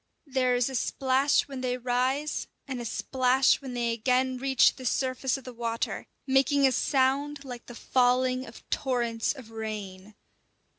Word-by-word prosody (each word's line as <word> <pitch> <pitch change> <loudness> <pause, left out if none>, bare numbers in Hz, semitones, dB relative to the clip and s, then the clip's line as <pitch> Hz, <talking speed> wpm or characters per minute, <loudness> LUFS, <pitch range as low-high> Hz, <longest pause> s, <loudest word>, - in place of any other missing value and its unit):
There 255 -3 +1
is 245 -1 +2
a 270 - -5
splash 265 +2 +2
when 270 -2 -6
they 250 -1 -1
rise, 255 +4 -1 0.2
and 255 -3 -4
a - - -6
splash 255 +3 +2
when 260 -3 -6
they 235 -1 0
again 255 +2 +1
reach 265 -1 +4
the 260 - -9
surface 260 +1 0
of 270 - -11
the 255 - -9
water; 230 -1 -3 0.2
making 275 +1 +3
a 265 - +5
sound 275 +2 +1
like 245 -2 -8
the 240 - -9
falling 255 +1 +1
of 225 - -13
torrents 235 -4 0
of 255 -6 -12
rain. 210 -3 -6
255 Hz, 160 wpm, -28 LUFS, 240-265 Hz, 0.2 s, a